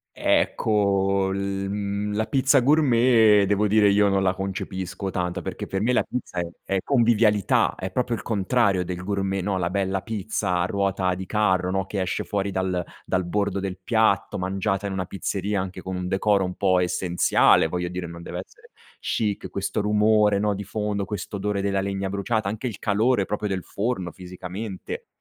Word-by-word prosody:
Ecco, 100 -2 +2
l 100 - -2
mhmm, 100 +1 -2
la 110 +1 0
pizza 135 0 +3
gourmet, 120 -7 +5
devo 105 +1 +2
dire, 105 0 +4
io 100 +1 +4
non 95 0 +2
la 95 -1 +2
concepisco 95 0 -4
tanto, 90 -1 -2
perché - - -5
per 95 - -3
me 120 +4 +2
la - - +3
pizza 125 -7 -5
è 85 - 0 0.2
è 95 -1 0
convivialità, 115 -6 +3
è 95 0 -5
proprio 120 +3 -1
il - - -8
contrario 100 -3 +1
del 90 0 -5
gourmet, 95 -1 -1
no, 100 0 -1
la 85 -1 -1
bella 95 0 -1
pizza 100 -4 -2
a 85 - +1
ruota 95 -1 0
di 95 +1 -6
carro, 95 -3 +1
no, 95 0 -1
che 95 -1 -2
esce 90 - -2
fuori 100 -1 -2
dal 95 -2 -1 0.2
dal 95 -1 0
bordo 100 +2 -1
del 95 -1 -4
piatto, 110 -3 +2
mangiata 95 +1 -1
in 100 - -3
una 90 -2 -2
pizzeria, 100 +1 -2
anche 95 -1 -7
con 95 0 -5
un 90 0 -3
decoro 100 +1 +2
un 90 0 -4
po' 95 -2 +3
essenziale, 90 -2 +3
voglio 90 +1 -2
dire, 90 0 -5
non 85 0 -9
deve - - -5
essere - - -21 0.3
chic, 105 -4 -2
questo 100 +3 -2
rumore, 105 0 +3
no, 105 0 +1
di 100 - -5
fondo, 105 -1 -2
questo 105 +1 -5
odore 100 0 -1
della 100 -1 0
legna 95 0 -2
bruciata, 100 +1 -1
anche 110 +5 -4
il 110 -5 -4
calore 110 +1 +2
proprio 105 +1 -3
del 95 -2 -2
forno, 100 -5 -3
fisicamente, 95 +2 -7
100 Hz, 185 wpm, -24 LUFS, 95-105 Hz, 0.3 s, gourmet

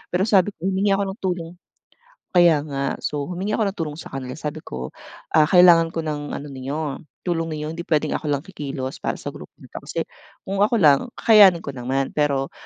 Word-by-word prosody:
Pero 185 - +2
sabi 200 -2 +3
ko - - -17
humingi 195 +1 +2
ako 200 - 0
ng 205 - -12
tulong 175 -3 -3 0.9
kaya 170 -4 +6
nga. 140 -1 -3
So, 145 -1 -2
humingi 185 +5 -3
ako 220 - +1
ng 195 -1 -3
tulong 150 -2 -3
sa 160 - -10
kanila 130 -1 -5
sabi 155 0 -5
ko, 65 - -7 0.4
"Ah, 155 0 +5
kailangan 175 -3 +7
ko 165 0 -4
ng 145 -1 -4
ano 145 - -7
ninyo 140 +2 -4 0.2
tulong 165 -2 -1
ninyo 155 0 -4
hindi 170 - -7
puwedeng 155 -3 0
ako 155 - -3
lang 145 0 -1
kikilos 140 -8 -6
para - - -1
sa - - -6
grupo - - -10
na - - -16
'to, - - -6
kasi - - -4 0.5
kung 195 +1 -2
ako 225 +3 +3
lang, 150 - +4
kakayanin 205 -6 +7
ko 140 - -5
naman. 130 +2 -2
Pero 140 -2 0
160 Hz, 210 wpm, -22 LUFS, 140-185 Hz, 0.9 s, kailangan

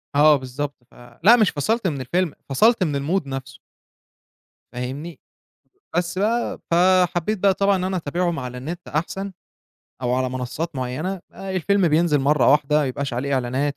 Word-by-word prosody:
آه 150 +1 +7
بالضبط، 130 +1 -6
ف - - -24 0.3
لأ، 230 +4 +8
مش 215 -6 +4
فصلت 205 - 0
من 140 -5 -2
الفيلم، 170 +5 -1 0.2
فصلت 220 - +4
من 145 -5 -1 0.2
الmood 145 - -14
نَفْسه. 135 -1 -6 1.1
فاهمني؟ 135 +7 -6 0.8
بس 175 0 -1
بقى 225 +4 0
فحبّيت 180 +3 +3
بقى 195 0 +3
طبعًا 200 +1 +2
إن 185 - -2
أنا 190 0 -1
أتابعهم 170 +1 -1
على 125 -1 -5
النِت 170 +7 -7
أحسن 190 +6 -3 0.7
أو 125 -1 0
على 130 0 0
منصّات 130 +6 -4
معيّنة 135 +10 -3
آآ 195 0 -7
الفيلم 190 0 +2
بينزِل 155 -1 +3
مرّة 135 -2 +4
واحدة 150 0 +3
ما 150 - +1
يبقاش 135 0 -3
عليه 140 +4 -2
إعلانات، 130 +3 0
155 Hz, 160 wpm, -22 LUFS, 135-185 Hz, 1.1 s, لأ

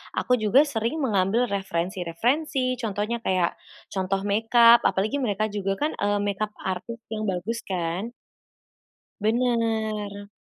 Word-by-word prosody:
aku 250 -2 +1
juga 225 +7 +5
sering 280 +2 -2
mengambil 210 +1 +2
referensi-referensi. 200 - -1
Contohnya 215 +1 -2
kayak 185 -5 0 0.3
contoh 195 0 -1
makeup 230 +3 +6
apalagi 215 +9 0
mereka 215 -3 -1
juga 195 -1 -1
kan, 300 +6 -1
eee, 205 0 +1
makeup 210 +1 -2
artist 220 +5 -4
yang 215 -1 -2
bagus 200 +5 -2
kan. 180 +2 -2 1.1
Benar. 220 -3 0
215 Hz, 115 wpm, -25 LUFS, 195-235 Hz, 1.1 s, makeup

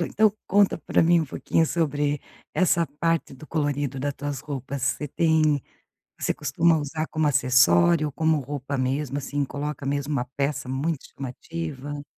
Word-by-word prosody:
Então 210 +4 +3 0.2
conta 200 0 +4
pra 155 - +2
mim 170 +1 +5
um - - -1
pouquinho 160 +4 +1
sobre 145 -3 0 0.3
essa 170 -2 +3
parte 165 -3 +1
do 135 +4 -12
colorido 145 -3 -1
da 145 +1 0
tuas 145 -1 -4
roupas. 140 -1 -5
Você 135 +2 0
tem 155 -2 +2 0.6
você - - 0
costuma 160 +3 +2
usar 155 +2 -3
como 155 -1 0
acessório, 130 - +4
como 160 +1 +2
roupa 140 0 -4
mesmo, 135 +2 -1
assim, 145 +1 -2
coloca 145 +1 -5
mesmo 140 +1 -1
uma 130 -4 0
peça 140 -2 -1
muito 140 +3 -2
chamativa? 145 +1 -6
145 Hz, 155 wpm, -25 LUFS, 135-160 Hz, 0.6 s, mim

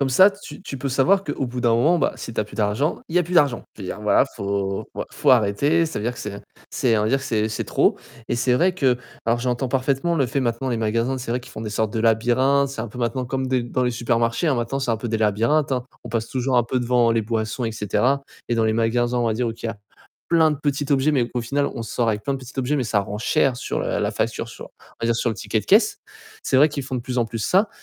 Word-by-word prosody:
Comme 140 - +2
ça, 190 +10 +7
tu 200 0 -12
tu 135 - -6
peux 135 +2 -2
savoir 180 +10 +3
qu'au 145 -4 -2
bout 125 +1 -5
d'un 120 -2 +3
moment, 160 +9 +3
bah - - +1
si 115 - -7
tu - - -1
as - - -1
plus - - -14
d'argent, 110 +8 0
il 165 - -3
y - - +7
a - - +3
plus 175 +3 -5
d'argent. 145 -8 +3
Je 105 - -9
veux 95 - -5
dire - - -5
voilà, 105 - +4
faut 100 -1 -2 0.3
faut - - +2
arrêter. 130 +9 +3
Ça 160 - -4
veut 105 - -4
dire 120 - 0
que - - -9
c'est 100 -1 -6 0.3
c'est 115 -3 +1
on - - +1
va 105 - +1
dire 135 +3 +2
c'est 110 -6 0
c'est 110 - -3
trop - - +2 0.3
et - - 0
c'est 125 +1 +1
vrai 180 +7 +2
que 130 -8 +2 0.3
alors 115 +1 +2
j'entends 125 +1 -1
parfaitement 135 +6 0
le 140 -5 +2
fait 130 - -2
maintenant 125 0 -1
les 120 - 0
magasins 115 +4 0
c'est 120 -2 -4
vrai 125 - -1
qu'ils 125 - -14
font - - -8
des 110 - -4
sortes 110 0 -1
de - - -2
labyrinthes, 120 +5 +3
c'est 135 -4 -6
un 115 - -4
peu 115 - -11
maintenant 120 +2 -1
comme 130 +1 -2
des 130 -1 +1
dans 125 +1 -1
les 125 - +1
supermarchés, 115 +4 0
hein, 150 - +3
maintenant 120 +2 -2
c'est 130 -4 0
un - - 0
peu 115 +2 -5
des 110 - -1
labyrinthes, 115 +8 +2
hein. 125 -1 -1 0.2
On - - -7
passe 115 0 -2
toujours 130 0 0
un 120 - +5
peu 120 +3 -1
devant 120 -1 +2
les 115 -1 +2
boissons 110 +2 -2
et 115 - -2
cetera 125 +6 +1 0.3
et 120 - +1
dans 115 -1 +2
les 110 - +2
magasins, 120 +2 +1
on 120 - +1
va 115 - +1
dire 120 +1 0
où - - -2
tu 115 - -7
as 115 -1 -4 0.5
plein 165 -2 +4
de 150 - -1
petits 145 0 0
objets, 140 +2 +3
mais 125 -5 +1
au 125 - 0
final, 140 +5 0
on 115 - -4
sort 115 +1 -1
avec 105 -1 -1
plein 140 - -1
de - - -4
petits 130 0 -11
objets, 135 +3 +1
mais 130 - 0
ça 110 -3 +1
rend 100 +1 -5
cher 125 +3 +2
sur, - - -3
heu, - - -1
la - - 0
facture, - - -2
sur - - -9
on - - -22
va - - +1
dire 115 0 +2
sur 115 - 0
le - - -3
ticket - - -2
de - - -13
caisse. - - +4 0.4
C'est - - +1
vrai 150 +3 +6
qu'ils 145 -2 -4
font 130 0 -5
de - - -2
plus 125 +1 -5
en 120 - +3
plus 115 0 -5
ça 190 - +2
120 Hz, 295 wpm, -22 LUFS, 115-135 Hz, 0.5 s, ça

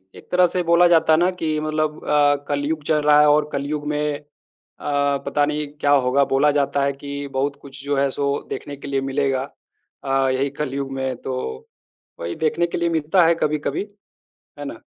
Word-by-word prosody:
एक - - -15
तरह 180 0 +5
से 180 +1 -1
बोला 170 +1 +5
जाता 160 -2 +4
है 155 - +4
ना 180 +1 +3
कि 160 -4 -2
मतलब 155 0 -2
अ, 145 -1 +4
कलियुग 145 +2 -2
चल 150 -1 +2
रहा 150 0 +5
है 150 - +5
और 150 0 +3
कलियुग 145 +1 -3
में 150 -1 -1
अ, 150 - -24 1.0
पता 145 -1 +1
नहीं 150 0 -2
क्या 145 - +2
होगा। 140 0 +4
बोला 145 +2 +4
जाता 140 -1 +1
है 140 0 +1
कि 140 +1 -6
बहुत 140 +2 -1
कुछ 140 0 -11
जो 145 0 0
है 140 0 +2
सो 140 +1 -1 0.2
देखने 145 - -6
के 140 - -9
लिए 135 -1 -1
मिलेगा 135 -1 0 0.6
अ, 135 -1 +1
यहीं 135 +1 0
कलियुग 135 -1 -3
में। 130 -1 -2
तो 130 - -4 0.9
वहीं 85 0 -4
देखने 160 +2 +1
के 170 - -4
लिए 170 0 +1
मिलता 165 +2 +2
है 170 - +4
कभी-कभी। 150 +5 -1 0.7
है - - -5
ना? - - -8
145 Hz, 195 wpm, -21 LUFS, 140-155 Hz, 1.0 s, तरह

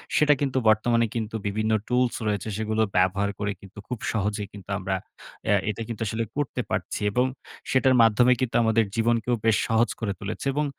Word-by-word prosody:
সেটা 150 -1 +5
কিন্তু 135 -2 0
বর্তমানে 115 +2 +3
কিন্তু 110 -1 -3
বিভিন্ন 110 +2 -1 0.2
tools 125 0 +1
রয়েছে, 105 0 -1
সেগুলো 110 0 -1 0.2
ব্যবহার 95 +2 +2
করে 105 0 -1
কিন্তু 100 +1 -15
খুব 125 -3 -4
সহজেই 105 -1 -1
কিন্তু 100 -1 -12
আমরা 95 0 -2 0.5
অ্যা 105 - +3
এটা 105 +2 -3
কিন্তু 115 -2 -6
আসলে 110 +3 -1
করতে 140 -3 -1
পারছি - - -2
এবং 125 +4 +2 0.5
সেটার 130 0 +4
মাধ্যমে 115 +3 +5
কিন্তু 130 -3 -1
আমাদের 110 0 +3
জীবনকেও 115 +1 +1
বেশ 110 -2 +4
সহজ 115 +1 +2
করে 105 -4 -2
তুলেছে 105 +6 -4
এবং 150 +1 +1
110 Hz, 180 wpm, -25 LUFS, 105-120 Hz, 0.5 s, সেটা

